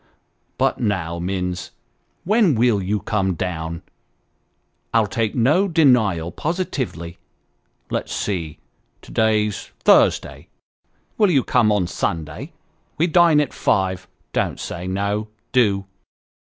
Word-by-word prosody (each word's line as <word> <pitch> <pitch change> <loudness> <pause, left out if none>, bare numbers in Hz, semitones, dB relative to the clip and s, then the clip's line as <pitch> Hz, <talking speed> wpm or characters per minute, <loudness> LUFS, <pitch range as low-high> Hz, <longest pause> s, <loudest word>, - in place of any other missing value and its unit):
But - - +1
now, 90 -6 -1
Minns, 90 0 -3 0.5
when 205 - +3
will 115 -3 +2
you 100 +2 -1
come 95 -5 0
down? 85 -1 -4 1.1
I'll 115 -2 +5
take 110 +2 -2
no 150 - +3
denial, 120 - +3
positively. 130 - -4 0.7
Let's - - -2
see, 85 -7 -3 0.5
to - - -13
day's 110 -2 +1
Thursday. - - +3 0.7
Will 210 -3 +5
you 140 -7 +3
come 115 -4 +3
on 100 -3 +2
Sunday? 85 - -4 0.5
We 165 - +3
dine 170 -2 +5
at 145 -3 -1
five, 95 -1 0 0.3
don't - - -1
say 90 +2 -5
no 100 +3 -1 0.2
do." 100 -6 +2
105 Hz, 110 wpm, -21 LUFS, 90-130 Hz, 1.1 s, I'll